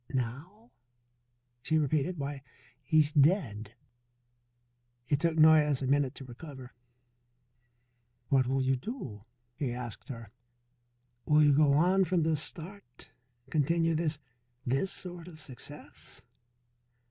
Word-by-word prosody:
"Now?" 150 - -5 0.9
she 160 +5 +1
repeated. 155 +4 0
"Why, 140 -1 -4 0.4
he 155 - +1
is 150 -1 +4
dead." 130 - +2 1.3
It 145 - +1
took 165 0 0
Noyes 155 -3 +5
a - - 0
minute 140 -1 +1
to 135 - -8
recover. 130 0 -10 1.6
"What 130 -2 +3
will 135 +1 +1
you 130 0 +2
do?" 125 - -7 0.3
he 135 -2 -2
asked 120 -3 -7
her. 115 -5 -8 1.0
"Will 150 0 +5
you 145 -1 +5
go 145 0 +4
on 185 +6 +4
from 175 -1 +1
this 155 -2 +1
start, 160 -3 -6 0.4
continue 165 +2 +2
this 160 -1 0 0.5
this 135 +10 0
sort 175 -2 -6
of 160 -3 -12
success?" 130 -5 -10
150 Hz, 120 wpm, -30 LUFS, 130-165 Hz, 1.6 s, Noyes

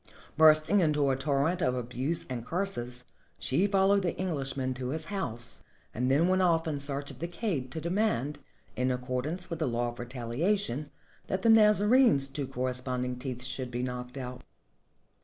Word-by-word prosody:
Bursting 155 +5 +5
into 150 -5 +2
a - - +1
torrent 145 +6 0
of 125 -4 +1
abuse 125 +6 -3
and 125 -3 -4
curses, 125 -8 -4 0.3
she 175 +10 +1
followed 200 0 +3
the 175 -3 -2
Englishman 135 -7 -2
to 125 0 -5
his 155 +3 0
house, 120 - -5 0.3
and 125 +3 0
then 150 +6 +4
went 185 0 +3
off 165 -2 +2
in 150 -3 -2
search 140 0 -2
of - - -13
the 170 - -3
kaid 170 - -3
to 160 - -4
demand, 170 - 0 0.4
in 125 +1 0
accordance 130 +8 -3
with 165 - -3
the 155 - 0
law 120 0 0
of 120 - -10
retaHation, 130 - -2 0.4
that 190 0 -2
the 230 - +4
Nazarene's 210 - +6
two 140 0 -4
corre 130 -1 -2
sponding 125 0 -2
teeth 125 -1 -5
should 130 0 -4
be 120 +1 -3
knocked 125 +1 -5
out. 125 -1 -6
140 Hz, 175 wpm, -29 LUFS, 125-175 Hz, 0.4 s, Nazarene's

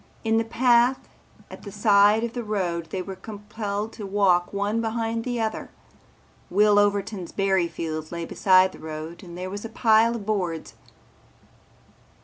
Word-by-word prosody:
In 225 -1 +2
the - - +1
path 240 +2 +2 0.4
at - - -10
the 200 - -9
side 205 +1 +4
of 235 0 -3
the 245 - -4
road 180 -6 -2
they 185 -1 -3
were 190 +1 -7
compelled 210 +1 -5
to 210 - -7
walk 190 -3 +2
one 205 +3 -1
behind 225 0 -2
the 245 -1 -3
other. 220 -1 -3 0.8
Will 205 +2 +4
Overton's 205 -2 0
berry 190 -3 +1
field 155 -2 -5
lay 170 -1 -4
beside 185 +1 +4
the - - -14
road 155 +2 -7
and 175 -3 -10
there 185 +1 -5
was 205 +1 -6
a 225 - -6
pile 225 0 +3
of 215 -4 -6
boards. 180 -7 -2
205 Hz, 160 wpm, -24 LUFS, 185-225 Hz, 0.8 s, side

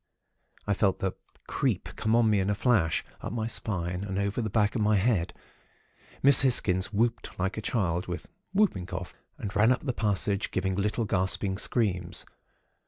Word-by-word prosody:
"I 105 - +1
felt 95 -1 +1
the 95 - -1 0.3
'creep' - - -1
come 110 +1 +1
on 120 -1 +4
me 105 -2 +3
in 95 +1 0
a 105 - +1
flash, 100 - +2 0.2
up - - -5
my 115 -2 -2
spine 90 -5 -2
and 95 -1 -4
over 100 +3 -1
the 110 - -2
back 105 0 +2
of 115 - -1
my 105 0 +3
head. 95 -4 +1 0.9
Miss 140 -1 +7
Hisgins 100 -8 +2
whooped 115 +3 -1
like 95 +2 -1
a 110 - -4
child 90 -6 -1
with 90 0 -5 0.2
whooping 190 - +1
cough, - - -6 0.2
and 105 +1 -6
ran 110 +4 +5
up 130 - 0
the 130 - 0
passage, 100 -2 0
giving 95 0 -1
little 105 +4 0
gasping 95 0 0
screams. 90 -8 0
105 Hz, 175 wpm, -28 LUFS, 95-115 Hz, 0.9 s, Miss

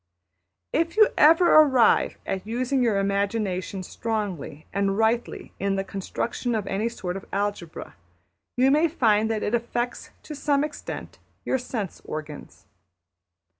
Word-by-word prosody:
If 335 +4 0
you 430 -1 +7
ever 330 +4 +6
arrive 270 -6 +5
at 195 +1 -4
using 255 +4 0
your 225 -5 +2
imagination 195 -1 -1
strongly 200 -8 -4
and 195 0 0
rightly 225 +2 0
in 195 0 0
the 195 - -1
construction 225 +5 -3
of 210 -2 -2
any 205 +4 -1
sort 185 -6 -5
of 195 - -9
algebra, 200 -5 -3 0.6
you 260 +2 +4
may 305 +4 +4
find 220 -8 +2
that 220 -1 -1
it 205 - -2
affects 240 +1 -2
to 305 - -8
some 285 -1 +1
extent 300 0 -7 0.3
your 265 - +1
sense 225 -6 -5
organs. 155 -1 -8
220 Hz, 135 wpm, -25 LUFS, 195-255 Hz, 0.6 s, you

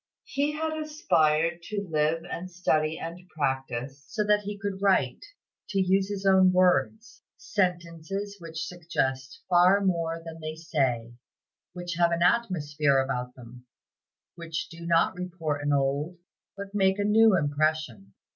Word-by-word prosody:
He 290 +2 -1
had 315 +1 -2
aspired 170 - +1
to 205 -2 -3
live 155 +1 0
and 180 +2 -6
study 160 -3 0
and 165 +2 -6
practice, 135 -2 -3
so 215 -2 -1
that 210 0 +4
he 205 0 -6
could 200 -1 -4
write 190 - +2 0.5
to 200 -3 0
use 190 +1 +2
his 200 -1 -4
own 190 -1 +6
words 185 +5 +1 0.2
"sentences 185 +1 -2
which 165 -2 -5
suggest 140 -6 -3
far 180 +2 +5
more 170 -4 0
than 165 0 -8
they 155 0 -5
say, 130 -8 -1 0.6
which 175 0 -5
have 170 0 +4
an 170 0 +1
atmosphere 155 -10 +2
about 125 -2 -2
them, 125 0 -13 0.7
which 165 -2 -5
do 170 0 -9
not 170 +2 +3
report 175 -5 -4
an 145 0 0
old, 140 +5 0 0.4
but 200 0 -7
make 190 -1 +2
a 205 - 0
new 215 -1 +5
impression." 145 - -1
170 Hz, 145 wpm, -27 LUFS, 150-195 Hz, 0.7 s, own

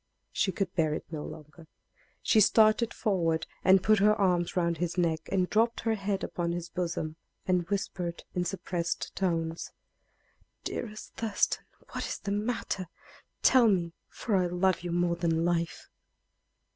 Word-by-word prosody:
She 190 - +1
could 190 0 -2
bear 155 -4 +1
it - - -6
no 155 -2 -4
longer. 155 +1 -11 0.6
She 220 - +4
started 220 +2 +5
forward 170 -6 0 0.2
and 190 0 +6
put 215 0 +4
her 210 +1 +5
arms 180 -4 +1
around 170 -1 +1
his 175 +1 -2
neck, 165 -2 0
and 185 -2 +2
dropped 230 +4 +1
her 225 -1 +1
head 200 -2 -2
upon 170 -1 -2
his 175 -1 -4
bosom, 165 -3 -3 0.3
and 180 -2 +1
whispered 180 -3 -3
in 180 - 0
suppressed 175 -1 -3
tones: 165 -3 -1 0.9
"Dearest 215 -2 -6
Thurston, 220 -3 0 0.3
what - - -3
is - - -3
the 200 - -5
matter? 205 -3 -2 0.6
Tell 250 -3 +6
me, 175 -5 +1 0.2
for 220 - -2
I 180 -2 +3
love 180 0 +1
you 175 0 -4
more 175 0 +1
than 165 -1 +1
life!" 170 -1 -1
180 Hz, 155 wpm, -29 LUFS, 170-200 Hz, 0.9 s, and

